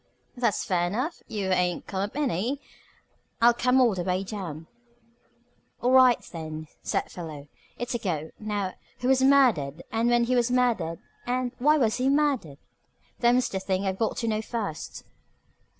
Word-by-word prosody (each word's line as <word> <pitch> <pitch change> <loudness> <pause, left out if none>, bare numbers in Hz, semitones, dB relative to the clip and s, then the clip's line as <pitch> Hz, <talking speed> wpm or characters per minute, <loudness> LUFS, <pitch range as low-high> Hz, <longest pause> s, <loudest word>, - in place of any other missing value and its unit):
That's 240 -4 0
fair 175 -2 +1
enough. 255 - -3
You 200 -3 -2
ain't 180 -1 +1
come 190 -1 -3
up 205 +4 -3
any. 260 - 0 0.8
I 235 0 +6
come 250 +2 +2
all 245 -4 +5
the 185 - -3
way 185 +1 0
down." 180 -6 -6 1.1
"All 245 - +1
right, 255 -2 +6
then," 155 -2 -6
said - - -2
Philo. 155 -5 -8 0.3
"It's 245 +1 -3
a 240 - -1
go. 160 -7 -3
Now, 205 -3 -2 0.3
who 250 - 0
was 265 0 +4
murdered, 235 - +3
and 230 +2 +1
when 240 0 +3
was 245 -1 +2
he 250 - 0
murdered, 220 -10 +1 0.3
and 250 0 0
why 300 +4 +4
was 225 -6 +2
he 260 +1 +1
murdered? 275 - +1 0.6
Them's 245 +1 +3
the 190 - -3
things 190 0 -1
I've 190 0 -2
got 225 - 0
to 230 - -2
know 215 -1 0
first." 220 -8 -5
220 Hz, 165 wpm, -27 LUFS, 180-250 Hz, 1.1 s, I